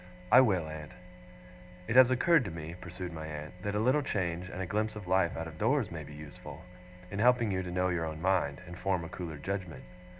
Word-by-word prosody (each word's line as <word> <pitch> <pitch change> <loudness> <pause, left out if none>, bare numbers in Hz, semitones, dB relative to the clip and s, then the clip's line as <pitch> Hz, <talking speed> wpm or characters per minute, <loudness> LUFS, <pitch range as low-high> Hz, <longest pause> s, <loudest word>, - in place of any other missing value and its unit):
'I 125 - +10
will, 95 -10 +2
aunt.' 80 -1 -8 0.9
'It 115 - -1
has 130 -1 +9
occurred 145 +4 +4
to - - -3
me,' 80 -1 -6
pursued 90 0 -6
my 80 -1 -6
aunt, 75 0 -6
'that 100 +1 -2
a - - +2
little 130 +7 +3
change, 90 -7 -2
and 95 - -7
a 95 - -1
glimpse 105 +4 -1
of 105 -3 -7
life 90 -1 +2
out 80 - -3
of 80 -1 -9
doors, - - +2
may - - -5
be 75 - -11
useful 75 -1 -10 0.5
in 100 - -4
helping 120 -1 +4
you 95 -1 0
to 90 - -5
know 90 +1 +1
your 85 -2 0
own 80 -1 -5
mind, 90 -6 +1
and 90 +1 -9
form 95 -2 0
a 80 - -7
cooler 85 -4 -6
judgement. 90 -3 -4
90 Hz, 230 wpm, -31 LUFS, 80-105 Hz, 0.9 s, I